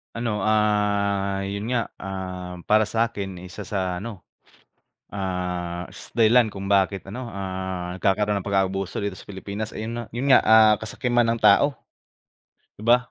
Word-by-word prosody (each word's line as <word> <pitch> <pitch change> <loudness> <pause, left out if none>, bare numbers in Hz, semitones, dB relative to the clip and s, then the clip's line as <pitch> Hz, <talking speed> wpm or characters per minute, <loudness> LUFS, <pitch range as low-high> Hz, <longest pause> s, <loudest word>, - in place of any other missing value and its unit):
Ano, 115 -4 -2
ah, 100 -2 +1
'yun 100 +4 -4
nga, 115 -3 0
ah, 90 -2 -6
para 110 +1 +5
sa'kin 105 -4 -2
isa 100 +3 -8
sa 95 -2 -2
ano, 110 -4 -8 0.9
ah 90 -3 -3
s - - -10
dahilan 115 +1 +5
kung 100 -1 -4
bakit 100 0 +2
ano, 120 +6 -6
ah 95 -3 -4
nagkakaroon 105 +1 +1
ng 100 - -6
pag-aabuso 95 -1 0
dito 100 - -1
sa 95 - -13
Pilipinas, 100 +2 -6
ayun 110 +1 -4
na 120 0 -4
'yun 130 +4 0
nga, 125 - +8
ah, 110 -1 +7
kasakiman 120 +1 0
ng 115 - +2
tao. 145 -1 +5 1.0
'Di 105 - -10
ba, 120 +2 +6
100 Hz, 150 wpm, -24 LUFS, 95-110 Hz, 1.0 s, nga